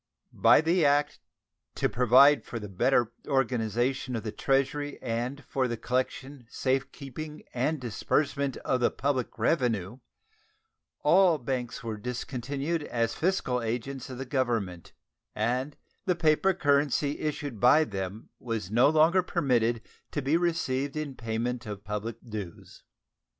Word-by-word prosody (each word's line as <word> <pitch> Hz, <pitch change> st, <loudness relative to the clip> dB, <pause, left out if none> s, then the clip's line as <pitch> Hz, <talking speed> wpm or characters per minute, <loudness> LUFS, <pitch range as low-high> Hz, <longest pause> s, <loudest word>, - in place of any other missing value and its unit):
By -, -, +6 dB
the 170 Hz, +2 st, +2 dB
act 145 Hz, +1 st, +2 dB, 0.6 s
to -, -, +1 dB
"provide 130 Hz, +2 st, +5 dB
for 120 Hz, -, -6 dB
the 105 Hz, -2 st, -6 dB
better 115 Hz, +5 st, +1 dB
organization 125 Hz, -1 st, 0 dB
of 115 Hz, -, -3 dB
the 110 Hz, -, -3 dB
Treasury 140 Hz, +3 st, 0 dB
and 125 Hz, +4 st, -3 dB
for 130 Hz, -2 st, 0 dB
the 120 Hz, -1 st, -3 dB
collection, 130 Hz, +1 st, -3 dB
safe 135 Hz, 0 st, -1 dB
keeping, 150 Hz, +3 st, -8 dB
and 140 Hz, +5 st, 0 dB
disbursement 140 Hz, +3 st, -1 dB
of 130 Hz, -, +1 dB
the 120 Hz, -, +3 dB
public 135 Hz, -3 st, -2 dB
revenue" 115 Hz, -, 0 dB, 1.0 s
all 185 Hz, -4 st, +5 dB
banks 125 Hz, -1 st, -4 dB
were 110 Hz, -2 st, -4 dB
discontinued 135 Hz, +7 st, -3 dB
as 115 Hz, -1 st, -1 dB
fiscal 155 Hz, -8 st, 0 dB
agents 120 Hz, +4 st, -4 dB
of 130 Hz, -, -7 dB
the 135 Hz, -, -5 dB
Government, 115 Hz, -, -2 dB, 0.4 s
and 125 Hz, +6 st, -1 dB, 0.3 s
the 180 Hz, -, +3 dB
paper 170 Hz, +3 st, +3 dB
currency 145 Hz, -2 st, +1 dB
issued 145 Hz, -6 st, -3 dB
by 125 Hz, +7 st, +6 dB
them 100 Hz, -3 st, -5 dB
was 110 Hz, -6 st, -4 dB
no 120 Hz, +5 st, +5 dB
longer 160 Hz, +4 st, +4 dB
permitted 120 Hz, -10 st, +1 dB, 0.3 s
to 145 Hz, -, -2 dB
be 140 Hz, +4 st, +2 dB
received 155 Hz, -5 st, 0 dB
in 150 Hz, -3 st, -3 dB
payment 120 Hz, 0 st, -3 dB
of 100 Hz, -1 st, -6 dB
public 105 Hz, +2 st, -4 dB
dues. 105 Hz, -6 st, -8 dB
130 Hz, 135 wpm, -28 LUFS, 115-145 Hz, 1.0 s, By